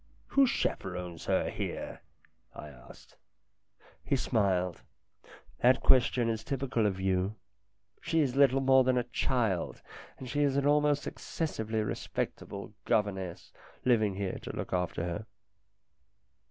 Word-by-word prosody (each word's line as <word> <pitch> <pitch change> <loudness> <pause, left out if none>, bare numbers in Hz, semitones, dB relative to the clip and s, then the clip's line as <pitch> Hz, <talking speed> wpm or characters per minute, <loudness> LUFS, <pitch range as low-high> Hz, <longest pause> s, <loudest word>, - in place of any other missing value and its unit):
" - - -34
Who 275 -1 +6
chaperons 90 - -3
her - - +1
here? - - -5 0.3
" - - -37
I 75 - -9
asked. 60 -4 -16 0.9
He - - +1
smiled. 95 -8 0 0.8
"That 125 +2 +4
question 125 -2 +4
is 110 -1 -1
typical 130 -5 0
of 95 -2 -2
you. 95 +2 0 0.7
She 165 -1 +1
is 135 -4 0
little 135 -1 +5
more 130 0 +6
than 130 0 +2
a 125 - +2
child, 120 -5 -1 0.3
and 130 - -8
she 145 +3 -1
has 140 -1 +2
an 140 - +1
almost 145 0 +3
excessively 110 -9 -3
respectable 100 -1 -4
governess 95 -4 -1 0.3
living 110 -6 +3
here 95 -1 -3
to - - -7
look - - -4
after 90 -2 -1
her. 90 +5 -3
115 Hz, 135 wpm, -31 LUFS, 95-135 Hz, 0.9 s, Who